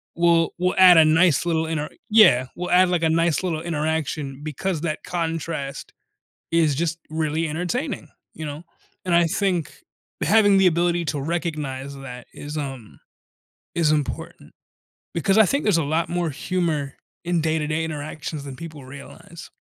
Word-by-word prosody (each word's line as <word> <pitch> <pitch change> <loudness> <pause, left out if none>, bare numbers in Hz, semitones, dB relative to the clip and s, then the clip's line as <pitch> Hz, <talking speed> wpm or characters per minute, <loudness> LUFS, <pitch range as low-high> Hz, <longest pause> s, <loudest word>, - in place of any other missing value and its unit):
will 170 -1 +3
will 180 0 +1
add 185 -2 +8
a 160 - +7
nice 165 +1 +4
little 160 -1 +1
inter 150 -2 -2 0.2
Yeah. 180 - +6
Will 180 0 -4
add, 180 0 +5
like, 175 -2 0
a 160 - +3
nice 165 +1 +1
little 165 -4 -2
interaction 155 -3 -2
because 155 +2 -3
that 155 -2 -3
contrast 165 -5 -4 0.6
is 160 -4 +3
just 165 +2 -1
really 160 +1 -1
entertaining. 180 - -3 0.2
You 155 - -7
know? 150 +3 -7 0.4
And 180 - 0
I 170 - +5
think 180 -2 -1 0.5
having 205 -2 +5
the 195 - +4
ability 175 0 +1
to 150 -2 -2
recognize 145 -4 -3
that 125 -3 -9
is, 150 +1 -7
um, 135 -6 -6 0.8
is 165 -3 +3
important 150 -3 -3 0.6
because 195 +5 +1
I 220 - +7
think 280 +9 0
there's 205 -5 +3
a - - 0
lot 155 +4 0
more 175 -1 -1
humor 155 -2 -2 0.3
in 175 -1 +1
day-to-day 155 0 0
interactions 150 -1 -5
than 135 - -7
people 155 -2 -9
realize. 140 +4 -11
160 Hz, 155 wpm, -23 LUFS, 150-175 Hz, 0.8 s, add